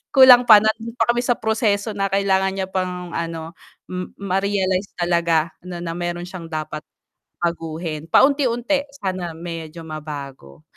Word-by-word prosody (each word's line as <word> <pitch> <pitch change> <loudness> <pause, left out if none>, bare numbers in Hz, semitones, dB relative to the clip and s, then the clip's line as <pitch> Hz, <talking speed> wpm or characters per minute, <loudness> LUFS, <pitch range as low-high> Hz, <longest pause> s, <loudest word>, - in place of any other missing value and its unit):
kulang 255 -2 +9
pa, 215 -3 +9
nandun 220 +2 -1
pa 225 - +3
kami 240 +1 -1
sa 245 - +1
proseso 220 -1 0
na 195 -1 -1
kailangan 190 -1 +2
niya 190 -1 -2
pang, 180 -1 -3
ano, 165 0 -4 0.4
m 180 0 -5
marealize 195 0 0
talaga 170 -2 +1
na 180 -1 -7
na 165 - -3
meron 175 0 -4
siyang 180 -2 -8
dapat 155 -1 -4 0.6
baguhin, 165 -2 -3
paunti-unti, 275 0 +3 0.2
sana 185 -3 -3
medyo 165 -1 -7
mabago, 140 - -8
180 Hz, 140 wpm, -21 LUFS, 165-205 Hz, 0.6 s, kulang